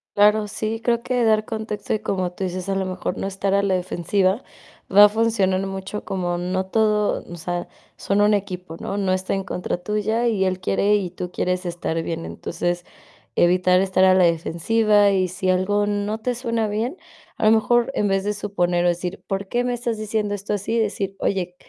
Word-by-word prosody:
Claro, 210 Hz, +1 st, +4 dB
sí, 220 Hz, +2 st, -3 dB
creo 235 Hz, 0 st, +1 dB
que 250 Hz, -1 st, 0 dB
dar 215 Hz, -1 st, +3 dB
contexto 220 Hz, -2 st, -4 dB
y 215 Hz, -, -1 dB
como 185 Hz, -2 st, -2 dB
tú 190 Hz, -, -8 dB
dices, 185 Hz, +1 st, -3 dB
a 195 Hz, -, +1 dB
lo 195 Hz, 0 st, 0 dB
mejor 185 Hz, 0 st, -3 dB
no -, -, -3 dB
estar 195 Hz, 0 st, -1 dB
a 200 Hz, -, +3 dB
la 195 Hz, -2 st, +1 dB
defensiva 185 Hz, +3 st, 0 dB, 0.5 s
va 205 Hz, +1 st, +9 dB
a -, -, +8 dB
funcionar 205 Hz, -4 st, +1 dB
mucho 195 Hz, +2 st, -5 dB
como 175 Hz, -2 st, -2 dB
no 185 Hz, +1 st, -2 dB
todo 210 Hz, 0 st, +1 dB
o 175 Hz, -, -7 dB
sea, 175 Hz, +1 st, -4 dB, 0.3 s
son 200 Hz, +1 st, 0 dB
un 210 Hz, 0 st, +4 dB
equipo, 185 Hz, -4 st, -4 dB
¿no? 200 Hz, -, -3 dB
No 195 Hz, -2 st, +1 dB
está 185 Hz, +1 st, -1 dB
en 195 Hz, 0 st, -2 dB
contra 180 Hz, -1 st, -3 dB
tuya, 210 Hz, +5 st, -1 dB
y 205 Hz, -5 st, +1 dB
él 185 Hz, 0 st, -1 dB
quiere 200 Hz, +2 st, +2 dB
y 185 Hz, -4 st, -2 dB
tú 180 Hz, 0 st, -6 dB
quieres 180 Hz, 0 st, -1 dB
estar 170 Hz, -1 st, -2 dB
bien. 165 Hz, 0 st, -4 dB
Entonces, 175 Hz, 0 st, -3 dB, 0.5 s
evitar 180 Hz, +1 st, +4 dB
estar 190 Hz, -1 st, +3 dB
a 185 Hz, -, +6 dB
la 185 Hz, -1 st, +5 dB
defensiva 205 Hz, +5 st, +3 dB
y 185 Hz, -1 st, +1 dB
si 185 Hz, +1 st, -1 dB
algo 205 Hz, +3 st, +1 dB
no 205 Hz, +1 st, -1 dB
te 245 Hz, +2 st, -2 dB
suena 230 Hz, -2 st, -1 dB
bien, 230 Hz, -, -2 dB, 0.4 s
a -, -, -2 dB
lo 215 Hz, -, +6 dB
mejor 240 Hz, +3 st, +3 dB
en 205 Hz, -, +1 dB
vez 195 Hz, 0 st, +1 dB
de 210 Hz, -, 0 dB
suponer 180 Hz, -4 st, 0 dB
o -, -, +5 dB
decir: 175 Hz, +2 st, -2 dB
"¿Por 195 Hz, 0 st, -2 dB
qué 240 Hz, 0 st, 0 dB
me 245 Hz, 0 st, -1 dB
estás 235 Hz, -2 st, -3 dB
diciendo 215 Hz, -1 st, -1 dB
esto 205 Hz, +1 st, -3 dB
así?" 205 Hz, +3 st, -1 dB
Decir: 200 Hz, -2 st, -2 dB
"Oye, 180 Hz, -2 st, -1 dB
195 Hz, 205 wpm, -22 LUFS, 185-215 Hz, 0.5 s, va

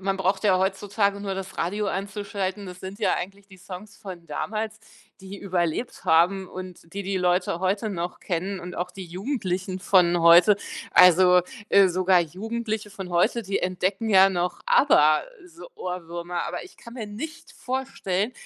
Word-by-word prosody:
man 195 Hz, 0 st, -1 dB
braucht 190 Hz, +1 st, 0 dB
ja 190 Hz, -3 st, +4 dB
heutzutage 200 Hz, +1 st, 0 dB
nur 200 Hz, -1 st, -4 dB
das 190 Hz, 0 st, -7 dB
Radio 205 Hz, +5 st, -1 dB
einzuschalten, 200 Hz, 0 st, -4 dB
das 180 Hz, 0 st, -9 dB
sind 190 Hz, +3 st, -9 dB
ja -, -, +2 dB
eigentlich 195 Hz, +2 st, -7 dB
die 190 Hz, -, -15 dB
Songs 195 Hz, +3 st, -10 dB
von 180 Hz, -4 st, -10 dB
damals, 215 Hz, +2 st, -4 dB, 0.4 s
die 190 Hz, +1 st, -9 dB
überlebt 185 Hz, +3 st, -2 dB
haben 180 Hz, +4 st, +3 dB
und 185 Hz, -3 st, -10 dB
die 200 Hz, -, -3 dB
die 195 Hz, 0 st, -2 dB
Leute 180 Hz, -1 st, +1 dB
heute 200 Hz, +4 st, 0 dB
noch 175 Hz, -2 st, -4 dB
kennen, 185 Hz, +3 st, -3 dB
und 175 Hz, +1 st, -8 dB
auch 180 Hz, +1 st, -3 dB
die 190 Hz, 0 st, -8 dB
Jugendlichen 185 Hz, -1 st, -3 dB
von 175 Hz, -3 st, +3 dB
heute 170 Hz, +4 st, +7 dB, 0.4 s
also, 180 Hz, 0 st, +7 dB, 0.3 s
äh, 195 Hz, -1 st, +6 dB
sogar 185 Hz, 0 st, +3 dB
Jugendliche 215 Hz, +5 st, -4 dB
von 190 Hz, -2 st, -8 dB
heute, 175 Hz, +7 st, +2 dB
die 195 Hz, 0 st, -1 dB
entdecken 185 Hz, +4 st, -1 dB
ja 195 Hz, -2 st, +6 dB
noch 175 Hz, -1 st, -2 dB
ABBA, 155 Hz, -, +5 dB, 0.2 s
so 340 Hz, +5 st, -13 dB
Ohrwürmer, 175 Hz, -1 st, -5 dB
aber -, -, -5 dB
ich 370 Hz, -, -16 dB
kann 235 Hz, -, -13 dB
mir 225 Hz, -4 st, -5 dB
nicht 300 Hz, +11 st, -8 dB
vorstellen, 250 Hz, -5 st, -3 dB
190 Hz, 165 wpm, -25 LUFS, 180-205 Hz, 0.4 s, heute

